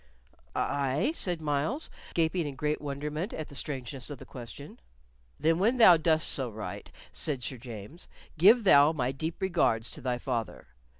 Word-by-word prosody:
"Aye," 140 Hz, -, 0 dB
said 175 Hz, -, -1 dB
Myles, 155 Hz, -, -1 dB, 0.2 s
gaping 165 Hz, 0 st, +1 dB
in 140 Hz, -, -6 dB
great 150 Hz, +3 st, -1 dB
wonderment 150 Hz, +6 st, -4 dB
at 155 Hz, -, -5 dB
the 140 Hz, -, -12 dB
strangeness 135 Hz, -2 st, -4 dB
of 145 Hz, -, -6 dB
the 135 Hz, -, -12 dB
question. 130 Hz, +3 st, -10 dB, 0.6 s
"Then 165 Hz, +2 st, +2 dB
when 230 Hz, +7 st, +2 dB
thou 215 Hz, -7 st, +9 dB
dost 160 Hz, -1 st, +2 dB
so 130 Hz, -3 st, -1 dB
write," 110 Hz, -1 st, -7 dB, 0.2 s
said 135 Hz, -5 st, -2 dB
Sir 130 Hz, -, -4 dB
James, 120 Hz, -, -10 dB, 0.3 s
"give 210 Hz, +9 st, +6 dB
thou 150 Hz, -5 st, +6 dB
my 130 Hz, -4 st, -1 dB
deep 160 Hz, +5 st, -4 dB
regards 170 Hz, -, +1 dB
to -, -, -7 dB
thy 125 Hz, -1 st, -1 dB
father." 120 Hz, -, -4 dB
145 Hz, 165 wpm, -29 LUFS, 130-165 Hz, 0.6 s, thou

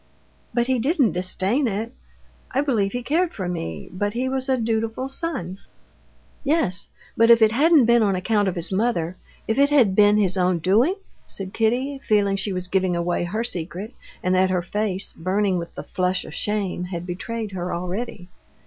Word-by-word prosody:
"But 240 Hz, 0 st, +1 dB
he 260 Hz, 0 st, +1 dB
didn't 270 Hz, -, +2 dB
disdain 190 Hz, -, 0 dB
it; 220 Hz, +3 st, -3 dB, 0.6 s
I 270 Hz, -, +1 dB
believe 225 Hz, -9 st, +1 dB
he 245 Hz, +2 st, -4 dB
cared 330 Hz, +7 st, 0 dB
for 185 Hz, -3 st, -3 dB
me, 80 Hz, -, -4 dB
but 205 Hz, +3 st, -2 dB
he 250 Hz, +2 st, -1 dB
was 265 Hz, 0 st, -2 dB
a 260 Hz, -, +3 dB
dutiful 225 Hz, +2 st, -1 dB
son...." 235 Hz, -, -4 dB, 0.8 s
"Yes, 275 Hz, -, +1 dB, 0.3 s
but 230 Hz, +1 st, +4 dB
if 235 Hz, 0 st, +8 dB
it 220 Hz, -1 st, +5 dB
hadn't 295 Hz, +2 st, +5 dB
been 235 Hz, 0 st, +4 dB
on 200 Hz, -3 st, +2 dB
account 205 Hz, +2 st, +1 dB
of 185 Hz, -, -1 dB
his 170 Hz, +1 st, -1 dB
mother, 190 Hz, -5 st, 0 dB, 0.3 s
if 220 Hz, +4 st, 0 dB
it 280 Hz, 0 st, +5 dB
had 245 Hz, -10 st, +4 dB
been 205 Hz, 0 st, +5 dB
his 190 Hz, -3 st, +1 dB
own 180 Hz, -1 st, +2 dB
doing?..." 215 Hz, -, +3 dB, 0.3 s
said 190 Hz, -1 st, -7 dB
Kitty, 250 Hz, +5 st, 0 dB
feeling 200 Hz, -2 st, +3 dB
she 195 Hz, +1 st, -2 dB
was 180 Hz, -1 st, -3 dB
giving 185 Hz, -1 st, +1 dB
away 175 Hz, 0 st, -1 dB
her 215 Hz, +6 st, -2 dB
secret, 190 Hz, +2 st, -4 dB, 0.3 s
and 185 Hz, -, +1 dB
that 185 Hz, 0 st, +3 dB
her 180 Hz, -2 st, 0 dB
face, 195 Hz, 0 st, -1 dB
burning 185 Hz, +1 st, 0 dB
with 170 Hz, -, -8 dB
the 140 Hz, -, -6 dB
flush 185 Hz, +4 st, -1 dB
of -, -, -10 dB
shame, 200 Hz, -2 st, -2 dB
had 175 Hz, -1 st, -5 dB
betrayed 215 Hz, +4 st, -4 dB
her 180 Hz, -1 st, -4 dB
already. 180 Hz, +2 st, -4 dB
205 Hz, 185 wpm, -23 LUFS, 185-240 Hz, 0.8 s, if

